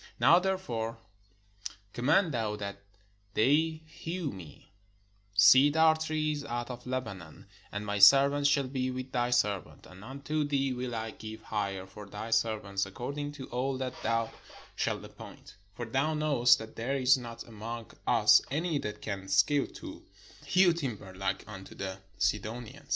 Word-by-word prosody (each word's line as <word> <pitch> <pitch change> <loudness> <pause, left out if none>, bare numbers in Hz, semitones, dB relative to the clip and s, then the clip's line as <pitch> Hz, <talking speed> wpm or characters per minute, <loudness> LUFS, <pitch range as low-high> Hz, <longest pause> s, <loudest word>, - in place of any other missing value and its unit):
Now 145 +9 +7
therefore 120 -13 -2 1.0
command 150 +8 +3
thou 110 -3 -1
that 100 -1 -6 0.5
they 155 +7 +2
hew 165 +1 -5
me 90 -5 -12 0.6
cedar 145 +10 +7
trees 155 -2 -2
out 120 -2 -4
of 125 0 -9
Lebanon; 100 -11 -5 0.3
and 105 +1 -4
my 105 -1 -2
servants 140 +7 +7
shall 140 -1 +2
be 130 -1 -2
with 130 0 -5
thy 120 0 0
servants: 105 -6 -1
and 95 +2 -13
unto 140 +5 -3
thee 140 -2 0
will 125 -1 -4
I 110 0 -3
give 110 0 -9
hire 100 -3 -3
for 100 +2 -11
thy 105 +3 -7
servants 105 -4 0
according 140 +8 -5
to 140 -3 -8
all 130 +2 -1
that 130 -1 -3
thou 115 -1 0 0.4
shalt - - -2
appoint: - - -12 0.2
for 120 - -4
thou 135 +7 0
knowest 145 -6 +4
that 110 0 -10
there 125 +5 -1
is 135 -1 +5
not 115 -2 -8
among 115 0 -7 0.2
us - - +6
any 155 +1 -1
that 105 - -6
can 100 -3 -4
skill 100 +9 +3
to - - -10 0.4
hew 185 -2 +4
timber 120 - -5
Uke 95 +1 -2
unto 95 -3 -10
the 95 -1 -5 0.2
Sidonians." 110 +3 -3
120 Hz, 150 wpm, -30 LUFS, 105-145 Hz, 1.0 s, Now